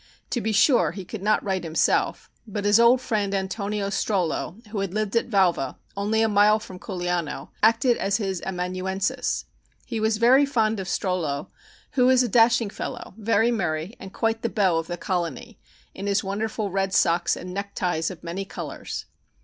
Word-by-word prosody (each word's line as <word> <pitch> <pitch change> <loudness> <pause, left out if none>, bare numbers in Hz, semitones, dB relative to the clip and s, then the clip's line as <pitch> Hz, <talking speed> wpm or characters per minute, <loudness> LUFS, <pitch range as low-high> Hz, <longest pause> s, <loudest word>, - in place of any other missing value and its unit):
To 240 - 0
be 220 - -1
sure 200 - +4
he 190 -1 -7
could 205 +2 -7
not 210 +2 +2
write 190 -3 -1
himself, 160 -1 0 0.2
but 205 -1 -4
his 205 +2 +5
old 235 +2 +6
friend 205 -5 -1
Antonio 200 +1 -2
Strollo, 195 -1 -1
who 210 -1 -3
had 195 0 -3
lived 215 0 -1
at 230 - +1
Valva, 180 - +2 0.2
only 210 +3 +1
a - - +3
mile 210 0 +5
from 190 -4 -10
Culiano, 175 -4 -3
acted 230 +3 +4
as 195 +1 +1
his 190 -5 -2
amanuensis. 185 +1 -2 0.4
He 230 -3 -3
was 220 0 +1
very 250 +5 +6
fond 225 -6 +1
of 190 - -5
Strollo, 175 -7 -2 0.4
who 250 -2 +3
was 255 -1 +5
a - - 0
dashing 230 -1 +4
fellow, - - -6
very 225 +1 +2
merry 175 -3 -2
and 190 - -9
quite 225 +2 -1
the 230 - -1
beau 190 -6 +2
of 165 - -5
the 175 - -4
colony, 170 -6 -3 0.3
in 195 +1 -6
his 200 -1 +1
wonderful 210 +1 -2
red 195 0 0
socks 170 0 +3
and 180 0 -7
neckties 185 -4 -2
of 180 -4 -10
many 175 +3 -4
colors. 195 - -6
200 Hz, 180 wpm, -25 LUFS, 185-220 Hz, 0.4 s, old